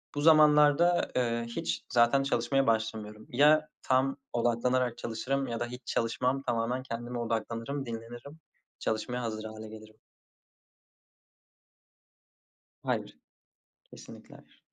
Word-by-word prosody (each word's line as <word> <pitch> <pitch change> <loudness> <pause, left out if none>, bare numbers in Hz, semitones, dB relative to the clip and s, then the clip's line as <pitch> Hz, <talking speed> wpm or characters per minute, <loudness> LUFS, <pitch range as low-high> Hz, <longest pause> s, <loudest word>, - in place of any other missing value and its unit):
Bu 145 - -1
zamanlarda, 155 +2 +5
eee, 115 -2 0
hiç 80 -8 -3
zaten 120 +3 +4
çalışmaya 135 0 +1
başlamıyorum. 110 -1 -2
Ya 150 +4 +4 0.2
tam 135 +1 +1 0.2
odaklanarak 120 +1 +1
çalışırım 135 +4 -2
ya 115 -1 -3
da 120 - -1
hiç 125 +1 -8
çalışmam 125 +4 0
tamamen 120 +1 -1
kendime 120 0 -5
odaklanırım, 115 +4 -3
dinlenirim. 120 +6 -8 0.4
Çalışmaya 115 +3 -2
hazır 110 -2 -4
hâle 110 0 -8
gelirim. 110 0 -13 2.8
Hayır. - - -3 0.7
Kesinlikle - - -14
hayır. - - -20
120 Hz, 105 wpm, -30 LUFS, 115-135 Hz, 2.8 s, zamanlarda